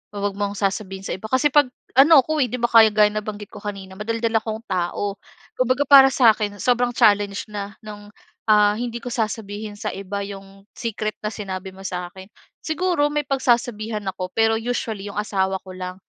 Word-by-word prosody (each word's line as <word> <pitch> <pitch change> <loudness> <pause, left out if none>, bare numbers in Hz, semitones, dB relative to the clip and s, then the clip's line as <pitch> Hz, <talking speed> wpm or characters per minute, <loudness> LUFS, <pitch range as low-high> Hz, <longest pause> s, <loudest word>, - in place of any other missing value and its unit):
wa - - -5
wag 205 - -1
mong 205 0 -2
sasabihin 195 -1 -2
sa - - -3
iba." 190 +4 -6
Kasi 260 +4 +2
'pag 290 -3 +5 0.3
ano 275 0 +7
ako, 310 +2 -2
eh, 255 - +2
'di 250 - -3
ba 240 - +2
kaya 225 -1 +8
gaya 210 0 +3
nabanggit 210 -1 -5
ko 210 - -10
kanina 195 -2 -7
madaldal 230 +1 -2
akong 220 0 -5
tao. 190 +2 -2 0.4
Kumbaga, 255 +3 +1
parang 270 -1 +8
sa'kin 215 -4 +3
sobrang 245 0 +1
challenge 205 -3 +2
na 205 -1 -6
no'ng, 205 -1 -10 0.4
ah, 210 -1 +5
hindi 235 +1 -4
ko 245 - -10
sasabihin 215 -2 -4
sa - - -3
iba 200 +1 -5
'yong 195 0 -11
secret 215 -2 -3
na 210 - -1
sinabi 190 -3 -6
mo 190 +1 -13
sa'kin. 180 +1 -6 0.4
Siguro, 325 -2 +1
may 295 0 0
pagsasabihan 235 -5 0
ako, 185 0 -6
pero 225 0 +3
usually 225 -4 -3
'yong 200 - -8
asawa 190 -2 -1
ko 185 - -11
lang. 185 0 -5
215 Hz, 185 wpm, -22 LUFS, 200-240 Hz, 0.4 s, kaya